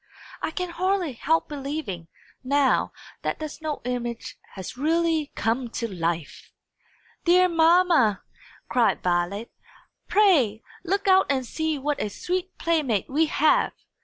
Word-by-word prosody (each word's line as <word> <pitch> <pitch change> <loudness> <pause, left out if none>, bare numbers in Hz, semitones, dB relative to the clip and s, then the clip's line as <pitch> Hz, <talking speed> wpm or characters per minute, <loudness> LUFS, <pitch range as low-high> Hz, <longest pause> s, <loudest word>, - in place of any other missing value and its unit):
I - - -1
can 360 +2 -4
hardly 370 -3 0
help 315 +7 +1
believing, 275 - -5 0.4
now, 275 +1 +2 0.3
that - - -2
the 310 - -4
snow 305 0 -5
image 240 -2 -4 0.2
has 190 +3 -7
really 320 +2 +1
come 235 +2 -1
to 230 - -1
life!" 170 -5 -4 0.7
"Dear 365 +1 +5
mamma!" 330 - +4 0.4
cried 235 -3 +2
Violet, 180 +5 -1 0.6
"pray 290 - +3 0.2
look 395 +3 -1
out 380 0 +5
and 265 -2 0
see 315 +4 -2
what 290 +2 -2
a 210 - -1
sweet 365 - -4
playmate 295 - 0
we 315 +3 +3
have!" 305 +1 +2
295 Hz, 130 wpm, -25 LUFS, 230-335 Hz, 0.7 s, Dear